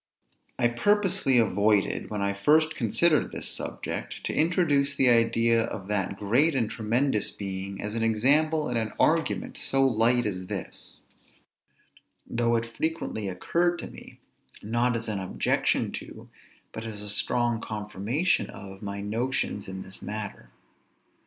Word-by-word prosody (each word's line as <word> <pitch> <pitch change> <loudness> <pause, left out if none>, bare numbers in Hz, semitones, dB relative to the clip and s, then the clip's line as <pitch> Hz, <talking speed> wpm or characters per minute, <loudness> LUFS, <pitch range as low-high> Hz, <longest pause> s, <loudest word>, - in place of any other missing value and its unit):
I 120 - +3
purposely 175 - +2
avoided, 105 -2 +2
when 105 -2 -2
I 100 0 0
first 155 +10 +3
considered 150 +7 +2
this - - -5
subject, - - -5
to - - -2
introduce 150 -4 +2
the 135 -2 +4
idea 115 0 +4
of 95 -4 -6
that 100 -2 -1
great 125 +11 +3
and 120 -4 +1
tremendous 115 +1 0
Being, 95 0 -5
as 105 +1 -3
an 115 - -2
example 145 +8 +2
in 125 - -1
an 110 -1 -2
argument - - +1
so 135 0 +3
light 120 0 +3
as 95 -3 -3
this; - - -6 1.2
though 120 0 0
it 115 0 0
frequently 115 -3 -3
occurred 170 - 0
to - - -7
me, - - -13 0.4
not 120 +3 +1
as 115 - -5
an 105 -2 -2
objection 95 -1 0
to, - - -9 0.4
but 110 - -7
as 105 -2 -6
a - - -6
strong 120 +2 +1
confirmation 110 - -1
of, 95 -1 -10
my 100 -1 -5
notions 110 0 -2
in 95 0 -6
this 95 0 -13
matter. 105 -1 -6
115 Hz, 145 wpm, -27 LUFS, 105-135 Hz, 1.2 s, the